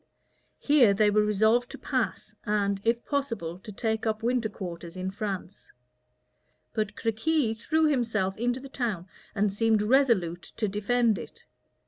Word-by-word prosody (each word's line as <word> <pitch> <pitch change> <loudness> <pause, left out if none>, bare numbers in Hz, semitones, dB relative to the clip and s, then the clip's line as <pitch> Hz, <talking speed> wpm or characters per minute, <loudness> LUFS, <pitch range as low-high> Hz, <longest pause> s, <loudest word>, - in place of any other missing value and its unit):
Here 260 -9 +4
they 210 0 +4
were 210 +1 +4
resolved 220 +4 +2
to - - -8
pass, - - -2
and, 200 -2 0
if 235 +1 +1
possible, 230 - -2
to 215 +2 -10
take 220 +2 -2
up 220 0 -1
winter 240 -2 +1
quarters 175 -3 -7
in 185 +1 -3
France; 195 -2 -6 1.0
but 215 -1 -2
Crequi 225 +3 0
threw 315 +8 +1
himself 225 -9 +1
into 245 +3 -1
the 275 - -9
town 225 -10 -3 0.3
and 200 -1 +1
seemed 220 0 +2
resolute 210 -9 +2 0.2
to 215 - 0
defend 220 +3 +1
it. - - -11
220 Hz, 145 wpm, -27 LUFS, 200-240 Hz, 1.0 s, Here